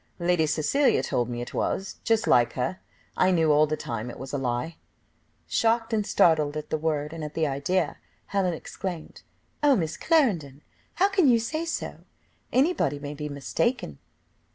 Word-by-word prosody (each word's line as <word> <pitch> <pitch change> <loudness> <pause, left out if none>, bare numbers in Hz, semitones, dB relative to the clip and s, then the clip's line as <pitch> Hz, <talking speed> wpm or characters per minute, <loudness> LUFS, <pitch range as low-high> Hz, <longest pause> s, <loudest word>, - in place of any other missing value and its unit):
"Lady 170 -2 +2
Cecilia 265 - +2
told 120 -1 -1
me 120 0 -4
it 120 - -7
was. 190 0 -2
Just 225 0 +2
like 120 -1 +4
her, 110 -8 -2 0.4
I 185 - +3
knew 165 -4 +3
all 150 +1 +5
the 155 +1 -2
time 115 0 -4
it - - -8
was 135 +2 -8
a - - 0
lie." 125 +5 -2 0.7
Shocked 225 0 +1
and 210 -2 0
startled 155 -5 +3
at 150 - -7
the - - +1
word, 150 -1 -1
and 165 -1 -6
at 150 0 -6
the 160 - +1
idea, 145 +4 -1 0.3
Helen 185 -4 0
exclaimed, 175 0 -7 0.4
"Oh! 290 -2 +5
Miss 160 -6 -2
Clarendon, 175 - +1 0.3
how 385 - +4
can 385 -6 +3
you 240 -2 +6
say 310 +9 -3
so? 335 - -4 0.5
anybody 255 - +2
may 145 0 -6
be 150 0 -5
mistaken. 140 - -2
160 Hz, 175 wpm, -26 LUFS, 145-225 Hz, 0.7 s, you